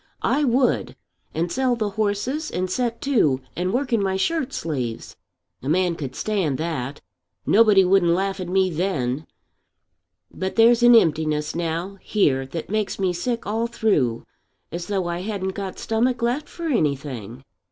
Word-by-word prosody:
I 280 +5 +2
would, 255 -1 +1 0.4
and 170 +2 -2
sell 255 +1 +1
the 215 -3 -2
horses 220 +9 -1
and 185 +1 -2
set 235 +1 -1
to 205 - +2 0.2
and 180 +1 -1
work 255 +2 -1
in 225 - +3
my 190 -1 0
shirt 280 +6 0
sleeves. 130 - -4 0.5
A 130 - -4
man 180 +2 +2
could 140 -5 -6
stand 190 -11 -1
that. 145 -5 -4 0.4
Nobody 210 -3 +5
wouldn't 180 -2 +4
laugh 195 +2 -1
at 180 -1 -4
me 190 0 +2
then. 150 -5 -1 1.1
But 190 0 -3
there's 230 +1 +5
an 240 0 +8
emptiness 155 -6 +2
now 170 +4 -3
here 135 -11 +1
that 160 +4 -5
makes 215 -1 -1
me 190 -2 0
sick 230 +7 -2
all 225 +3 -1
through, 195 - 0 0.5
as 170 0 -5
though 195 -3 -1
I 175 0 -2
hadn't 190 -1 -3
got 195 -1 -5
stomach 235 +2 0
left 250 +6 -1
for 340 - -9
anything." 140 - -2
190 Hz, 160 wpm, -23 LUFS, 160-230 Hz, 1.1 s, an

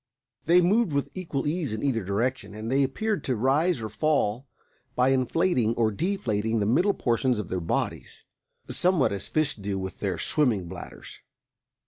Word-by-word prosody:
They 175 +3 +6
moved 195 0 +2
with 140 0 -1
equal 165 -7 -3
ease 155 -2 -1
in 110 +3 -4
either 125 -6 0
direction, 105 +4 -2
and 110 +2 -5
they 135 +1 +3
appeared 200 +11 -1
to 130 - 0
rise 140 +8 +2
or 110 - -3
fall 120 +1 0 0.5
by 125 +1 +3
inflating 130 -2 +1
or 110 -2 +2
deflating 115 - -1
the 100 - +1
middle 175 - +3
portions 120 0 +1
of 105 -4 -4
their 90 -1 -2
bodies, 85 - -3 0.4
somewhat 175 -5 +2
as 100 -1 -5
fish 155 -2 0
do 100 -2 -4
with 95 0 -6
their 95 -4 -2
swimming 115 - +1
bladders. - - -10
130 Hz, 165 wpm, -26 LUFS, 110-155 Hz, 0.5 s, They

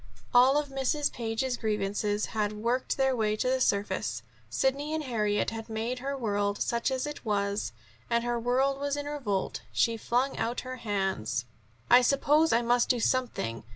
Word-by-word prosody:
All 255 +3 +6
of 295 -1 -1
Mrs. 275 +2 0
Page's 240 +2 -2
grievances 210 -1 -1
had 210 -1 0
worked 235 +4 -1
their 265 -1 +2
way 215 -2 +1
to 215 - -1
the 260 0 +1
surface. 190 - 0 0.3
Sidney 280 - 0
and 315 - -2
Harriet 210 -6 0
had 225 0 -7
made 225 +3 -2
her 275 +2 -3
world, 205 -4 -1
such 235 +2 0
as 260 0 -1
it 295 0 -6
was, 200 -2 -1 0.4
and 235 0 +2
her 240 0 -1
world 265 +3 +1
was 285 0 -1
in 290 - -3
revolt. 255 -10 -2
She 230 -1 +2
flung 250 +5 0
out 230 +2 -1
her 255 0 -6
hands. 190 - -1 0.4
"I 245 - +7
suppose 290 +5 +3
I 235 +1 +3
must 240 +1 +2
do 245 - +3
something. 225 - -1
235 Hz, 175 wpm, -29 LUFS, 210-265 Hz, 0.4 s, I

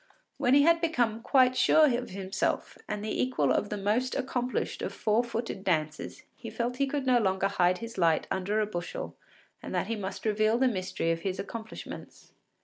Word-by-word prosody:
When 250 +2 +3
he 285 - +6
had 335 +1 +4
become 240 -9 0
quite 255 0 +4
sure 310 +4 +5
of 245 +1 -4
himself 190 0 -2
and 210 0 -3
the 215 - -1
equal 150 - +1
of 205 - +1
the 210 - -3
most 215 +6 0
accomplished 255 -2 -2
of - - -3
four 220 +3 +1
footed 230 -4 -4
dancers, 155 -4 -2
he 230 - -8
felt 235 +3 -3
he 275 0 +1
could 275 0 -2
no 250 -2 +4
longer 190 -2 +1
hide 180 -2 +2
his 230 -1 -7
light 165 -3 +3
under 195 +3 0
a 215 - +2
bushel 175 -4 -5 0.5
and - - -6
that - - +1
he 230 - -2
must 195 0 -6
reveal 215 +1 +2
the 260 +1 +3
mystery 185 -6 -1
of 165 - -1
his 190 0 -2
accomplishments. 220 +3 -8
220 Hz, 195 wpm, -29 LUFS, 190-250 Hz, 0.5 s, he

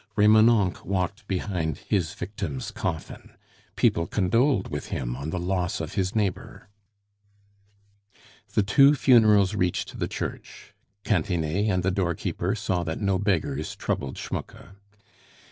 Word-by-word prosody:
Remonencq 110 -2 +4
walked 100 +3 -2
behind 90 -5 -2
his 95 -3 -2
victim's 90 -8 -5
coffin. 80 -4 -5 0.4
People 85 - +2
condoled 105 +3 +1
with 75 0 -5
him - - -3
on 70 +4 -5
the 90 - -3
loss 90 +1 -1
of 80 -1 -5
his 95 +1 -1
neighbor. 100 -2 -3 1.9
The 105 - +4
two 140 +8 +5
funerals 110 -7 +5
reached 90 -4 -2
the - - -1
church. - - -7 0.3
Cantinet 90 +1 0
and 90 -2 0
the 95 - +1
doorkeeper 90 +1 -1
saw 95 -4 -1
that 80 -1 -4
no 100 -3 +1
beggars 80 -7 -1
troubled 65 -1 -3
Schmucke. - - -7
95 Hz, 125 wpm, -26 LUFS, 85-105 Hz, 1.9 s, two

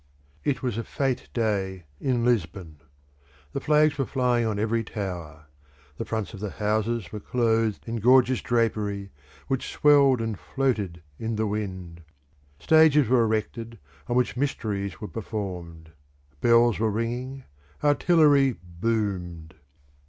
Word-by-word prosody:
It 135 -3 -1
was 120 -3 -1
a - - -3
fęte 130 +1 -2
day 100 -5 -1 0.2
in 125 -3 0
Lisbon. 95 -8 -1 0.8
The 140 - -1
flags 150 0 +3
were 135 - 0
flying 125 -3 +1
on 105 -2 -1
every 115 +2 0
tower; 85 -8 -6 0.5
the - - -4
fronts 110 -2 -3
of 100 - -8
the 105 0 -3
houses 110 -1 -1
were 105 - -5
clothed 115 -2 0
in 115 0 -3
gorgeous 125 +3 +4
drapery, 105 -4 -1 0.4
which 135 -2 -2
swelled 140 -3 +5
and 110 -3 -3
floated 105 - -2 0.2
in 115 0 -2
the 110 +1 0
wind; 95 -5 -5 0.6
stages 155 - +5
were 125 -2 +4
erected 115 +1 -3 0.3
on 120 - -1
which 125 0 +1
mysteries 105 -7 -2
were 105 - -5
performed; 90 -6 -6 0.5
bells 120 +1 +4
were 110 0 +2
ringing, 120 +5 -3 0.4
artillery 145 -3 +4
boomed. 90 -3 -3
115 Hz, 130 wpm, -26 LUFS, 100-125 Hz, 0.8 s, swelled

